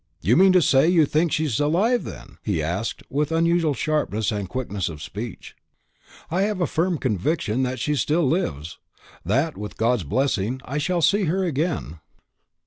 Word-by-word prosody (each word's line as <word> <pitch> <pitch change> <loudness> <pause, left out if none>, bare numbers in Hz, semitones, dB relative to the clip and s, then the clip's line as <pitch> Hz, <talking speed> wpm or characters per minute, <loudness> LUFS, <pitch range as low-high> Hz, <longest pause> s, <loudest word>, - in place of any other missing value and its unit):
You 105 +9 +2
mean 190 +4 +6
to 180 -2 +5
say 135 +2 +4
you 170 -3 +5
think 155 +3 +1
she's 150 -7 0
alive, 190 +12 +2
then?" - - -10
he 100 -6 -1
asked, 90 +8 -3
with 150 +2 -1
unusual 165 -2 +2
sharpness 150 -10 -1
and 100 -3 -3
quickness 105 -8 -3
of 80 -2 -8
speech. 105 +7 -7 0.8
"I 180 +3 +1
have 205 -1 0
a 175 - +2
firm 170 +2 0
conviction 125 - -1
that 130 0 -1
she 150 - 0
still 155 +5 +1
lives; 85 - -2 0.4
that, 135 - 0
with 105 0 -7
God's 115 -2 +1
blessing, 120 - 0
I 140 +4 -3
shall 170 +2 0
see 205 +3 +3
her 185 +4 0
again." 135 - -2
145 Hz, 170 wpm, -23 LUFS, 110-170 Hz, 0.8 s, mean